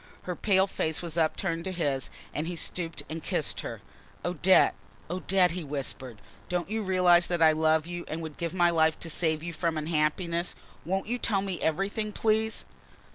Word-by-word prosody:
Her 180 Hz, -, -3 dB
pale 190 Hz, -1 st, +3 dB
face 160 Hz, -4 st, -1 dB
was 165 Hz, -2 st, -4 dB
upturned 165 Hz, +1 st, 0 dB
to 190 Hz, -, -2 dB
his 145 Hz, -7 st, -1 dB, 0.2 s
and 155 Hz, +2 st, -2 dB
he 175 Hz, -, -3 dB
stooped 165 Hz, 0 st, -2 dB
and 160 Hz, +1 st, -5 dB
kissed -, -, -1 dB
her. -, -, -7 dB, 0.4 s
"Odette! 180 Hz, +1 st, +4 dB, 0.4 s
Odette!" 185 Hz, 0 st, +2 dB
he 175 Hz, 0 st, -4 dB
whispered. 135 Hz, -5 st, -4 dB, 0.3 s
"Don't 180 Hz, +2 st, -2 dB
you 220 Hz, 0 st, 0 dB
realise 180 Hz, -3 st, +4 dB
that 175 Hz, -1 st, 0 dB
I 160 Hz, -1 st, +7 dB
love 155 Hz, 0 st, +2 dB
you 175 Hz, 0 st, -5 dB
and 160 Hz, -, -4 dB
would 155 Hz, -2 st, -6 dB
give 170 Hz, +1 st, -3 dB
my 175 Hz, -1 st, +4 dB
life 160 Hz, -1 st, +2 dB
to 165 Hz, -, -3 dB
save 160 Hz, -1 st, 0 dB
you 170 Hz, 0 st, -4 dB
from 165 Hz, -1 st, -1 dB
unhappiness? 165 Hz, +3 st, 0 dB, 0.3 s
Won't 190 Hz, +3 st, -1 dB
you 245 Hz, +3 st, -2 dB
tell 195 Hz, -5 st, +1 dB
me 190 Hz, -3 st, -2 dB
everything, 205 Hz, +6 st, -1 dB
please?" 220 Hz, +1 st, +1 dB
170 Hz, 185 wpm, -28 LUFS, 160-185 Hz, 0.4 s, I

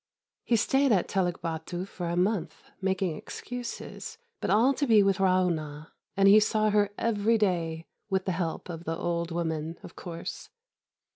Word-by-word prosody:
He 240 Hz, -, +2 dB
stayed 270 Hz, +4 st, +3 dB
at 190 Hz, -5 st, +3 dB
Teluk 180 Hz, -2 st, -1 dB
Bâtu 170 Hz, +3 st, -4 dB
for 180 Hz, -3 st, -5 dB
a 170 Hz, -, -1 dB
month, 180 Hz, -3 st, 0 dB, 0.2 s
making 190 Hz, -3 st, 0 dB
excuses, 245 Hz, +9 st, -7 dB, 0.2 s
but -, -, -2 dB
all 230 Hz, +7 st, +5 dB
to 285 Hz, +1 st, -1 dB
be 215 Hz, -3 st, +6 dB
with 195 Hz, -1 st, +2 dB
Ra'ûnah; 170 Hz, -5 st, +1 dB, 0.3 s
and 195 Hz, 0 st, +5 dB
he 205 Hz, +2 st, +9 dB
saw 215 Hz, 0 st, +2 dB
her 205 Hz, -1 st, +3 dB
every 225 Hz, 0 st, +2 dB
day 165 Hz, -5 st, 0 dB, 0.2 s
with 190 Hz, -1 st, 0 dB
the 190 Hz, -, 0 dB
help 170 Hz, -2 st, -3 dB
of 170 Hz, -1 st, -7 dB
the 165 Hz, +1 st, -2 dB
old 170 Hz, -1 st, -1 dB
woman, 165 Hz, -1 st, -2 dB
of -, -, -11 dB
course. 170 Hz, -2 st, -7 dB
185 Hz, 165 wpm, -28 LUFS, 170-210 Hz, 0.3 s, he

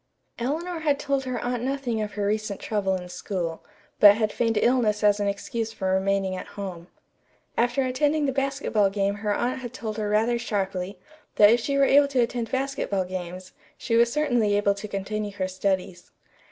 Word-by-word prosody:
Eleanor 325 Hz, +8 st, -2 dB
had 295 Hz, -3 st, +1 dB
told 275 Hz, -2 st, -1 dB
her 255 Hz, -1 st, -2 dB
aunt 245 Hz, -1 st, -2 dB
nothing 255 Hz, -3 st, -2 dB
of 210 Hz, -1 st, -4 dB
her 205 Hz, -1 st, -2 dB
recent 210 Hz, -1 st, -1 dB
trouble 195 Hz, -3 st, -1 dB
in 180 Hz, -1 st, -6 dB
school, 175 Hz, -3 st, -4 dB, 0.4 s
but 205 Hz, -1 st, +9 dB
had 215 Hz, -1 st, 0 dB
feigned 230 Hz, -2 st, 0 dB
illness 225 Hz, -3 st, +2 dB
as 205 Hz, 0 st, +4 dB
an 205 Hz, -, 0 dB
excuse 220 Hz, +3 st, -3 dB
for 190 Hz, -4 st, -1 dB
remaining 190 Hz, 0 st, +1 dB
at -, -, -7 dB
home. 180 Hz, -4 st, -6 dB, 0.7 s
After 245 Hz, +3 st, +1 dB
attending 290 Hz, +4 st, +1 dB
the 275 Hz, -, +1 dB
basketball 270 Hz, -6 st, +1 dB
game 200 Hz, 0 st, 0 dB
her 205 Hz, +1 st, -2 dB
aunt 250 Hz, +2 st, -1 dB
had 245 Hz, -2 st, -7 dB
told 220 Hz, -3 st, -5 dB
her 210 Hz, -1 st, -1 dB
rather 225 Hz, +3 st, +2 dB
sharply 195 Hz, -4 st, -3 dB, 0.4 s
that 205 Hz, 0 st, +7 dB
if 235 Hz, -, +4 dB
she 275 Hz, +4 st, -1 dB
were 275 Hz, -, +5 dB
able 280 Hz, +1 st, +5 dB
to 275 Hz, -2 st, -1 dB
attend 235 Hz, -1 st, -1 dB
basketball 265 Hz, -8 st, -1 dB
games, 185 Hz, 0 st, -6 dB, 0.3 s
she 230 Hz, -, -1 dB
was 235 Hz, 0 st, +4 dB
certainly 245 Hz, -9 st, +2 dB
able 205 Hz, -1 st, +2 dB
to 200 Hz, +1 st, -7 dB
continue 205 Hz, +1 st, -4 dB
her 185 Hz, -2 st, -2 dB
studies. 185 Hz, -1 st, -2 dB
215 Hz, 190 wpm, -25 LUFS, 195-250 Hz, 0.7 s, but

